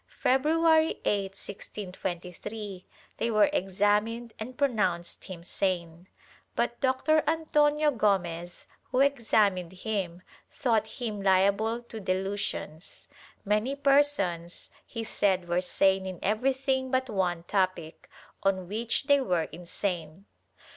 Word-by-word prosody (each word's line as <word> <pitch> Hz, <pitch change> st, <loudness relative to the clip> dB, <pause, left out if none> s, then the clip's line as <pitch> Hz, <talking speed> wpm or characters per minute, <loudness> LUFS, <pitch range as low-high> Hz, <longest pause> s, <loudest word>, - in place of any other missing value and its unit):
February 315 Hz, +4 st, +3 dB
8, 195 Hz, -2 st, 0 dB
1623, 190 Hz, 0 st, -6 dB, 0.3 s
they 230 Hz, -, 0 dB
were 220 Hz, +6 st, +4 dB
examined 210 Hz, +4 st, +1 dB
and 245 Hz, +3 st, -7 dB
pronounced 195 Hz, -11 st, 0 dB
him 180 Hz, -3 st, -8 dB
sane, 175 Hz, -2 st, -2 dB, 0.5 s
but 240 Hz, 0 st, 0 dB
Dr. 275 Hz, +4 st, +3 dB
Antonio 300 Hz, -1 st, +3 dB
G6mez, 175 Hz, -7 st, -1 dB, 0.2 s
who 255 Hz, +1 st, +2 dB
examined 215 Hz, -10 st, +2 dB
him, 185 Hz, -3 st, -3 dB, 0.3 s
thought 225 Hz, -5 st, +1 dB
him 220 Hz, -3 st, -4 dB
liable 200 Hz, +5 st, +2 dB
to 230 Hz, -2 st, -8 dB
delusions; 190 Hz, -4 st, -3 dB, 0.4 s
many 215 Hz, +7 st, +1 dB
persons, 275 Hz, -12 st, +1 dB, 0.2 s
he 230 Hz, -2 st, -5 dB
said 190 Hz, -5 st, +1 dB
were 175 Hz, +1 st, +1 dB
sane 190 Hz, +1 st, +2 dB
in 185 Hz, -1 st, -5 dB
everything 260 Hz, +5 st, +1 dB
but 260 Hz, 0 st, +1 dB
one 180 Hz, -6 st, -1 dB
topic, 185 Hz, -4 st, -1 dB, 0.3 s
on 190 Hz, -2 st, +1 dB
which 225 Hz, +7 st, -1 dB
they 285 Hz, 0 st, +4 dB
were 180 Hz, -9 st, +1 dB
insane. 175 Hz, 0 st, -4 dB
205 Hz, 110 wpm, -28 LUFS, 185-255 Hz, 0.5 s, were